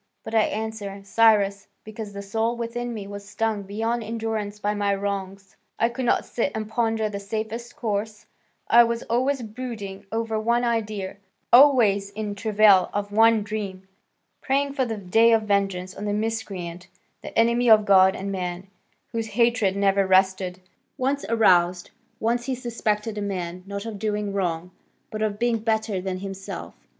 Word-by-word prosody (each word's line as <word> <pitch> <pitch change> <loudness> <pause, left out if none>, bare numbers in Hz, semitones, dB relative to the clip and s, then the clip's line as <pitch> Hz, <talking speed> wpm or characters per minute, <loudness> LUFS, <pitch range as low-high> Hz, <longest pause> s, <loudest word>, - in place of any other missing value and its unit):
But - - -8
I 220 - +5
answer, 215 -2 -4
Cyrus, 200 -1 +3 0.2
because 215 -1 -7
the 200 0 -7
soul 225 +4 -1
within 240 +1 -4
me 215 -4 -6
was 200 0 -8
stung 220 -2 -1
beyond 225 +4 -2
endurance 220 -2 -3
by 210 0 -1
my 205 -1 0
wrongs; 195 -1 -5 0.2
I 230 - +2
could 245 +2 -4
not - - +2
sit 245 +4 -1
and 215 -1 -3
ponder 225 -1 0
the 200 -1 -5
safest 220 +4 -5
course, 210 -1 -3 0.4
I 235 +1 +7
was 235 0 -2
always 255 +3 0
brooding 215 -4 -7
over 225 -1 -1
one 235 +2 +1
idea, 215 -5 -2 0.4
always 235 -7 +6
in 205 0 -4
travail 205 -2 +4
of 205 0 -2
one 225 0 +4
dream, 200 -3 -5 0.5
praying 275 +1 0
for 265 -2 0
the 225 -2 -4
day 225 +4 +4
of 225 -1 +3
vengeance 195 -3 0
on 205 - -7
the 205 - -1
miscreant, 195 -5 -4 0.3
the - - -8
enemy 235 +1 +3
of 215 -1 +7
God 190 -1 +6
and 195 +1 -4
man, 180 -1 -4 0.5
whose 225 -1 -3
hatred 225 -2 +2
never 195 -1 +2
rested, 190 -1 +2 0.4
once 275 +1 -1
aroused, 180 -6 +3 0.3
once 235 +2 0
he 265 0 -1
suspected 225 -3 -2
a - - -3
man, 185 -3 -4
not 200 +1 -5
of 220 -3 -6
doing 210 -1 -2
wrong, 180 -2 -2 0.4
but 215 - -4
of 210 -1 -1
being 235 0 +1
better 220 -3 -1
than 185 0 -4
himself. 195 -1 -7
210 Hz, 165 wpm, -24 LUFS, 195-230 Hz, 0.5 s, I